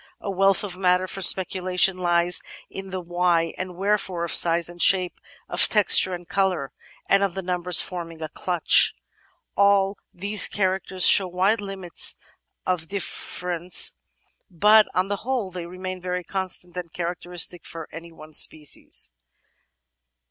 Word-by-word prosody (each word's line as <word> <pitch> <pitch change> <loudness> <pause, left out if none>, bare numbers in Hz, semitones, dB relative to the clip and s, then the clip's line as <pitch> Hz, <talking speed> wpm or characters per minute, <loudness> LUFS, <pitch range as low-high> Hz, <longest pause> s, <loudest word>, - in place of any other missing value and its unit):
A 200 - -5
wealth 195 0 +1
of 195 -3 -6
matter 180 0 +1
for 195 +1 -4
speculation 185 0 +2
lies 175 -1 +1 0.3
in 195 0 -9
the 190 0 -5
why 175 -1 -1
and 185 -1 -7
wherefore 195 -2 -2
of 170 - -3
size 170 0 +4
and 175 0 -8
shape, 185 -2 +2 0.3
of - - +3
texture 195 -3 +4
and 175 -1 -12
colour, 185 -9 -2 0.4
and 195 - +3
of 195 -3 -1
the 190 - -5
numbers 180 -1 +1
forming 165 -3 -7
a - - -4
clutch. 175 +1 +2 0.6
All 200 0 +2
these 200 +2 +4
characters 190 -1 -1
show 195 - +6
wide 190 +5 0
limits 195 -3 +1 0.5
of 180 -3 -2
diflFerence, 180 -2 -1 0.6
but 210 +4 +4
on 185 +1 0
the 205 0 -3
whole 235 -4 -4
they 175 -1 -8
remain 185 +1 -8
very 180 0 -4
constant 185 -1 -5
and 175 -2 -7
characteristic 175 0 -2
for 165 -2 -8
any 165 +1 -10
one 155 -1 -15
species. 150 - -1
180 Hz, 145 wpm, -23 LUFS, 175-195 Hz, 0.6 s, show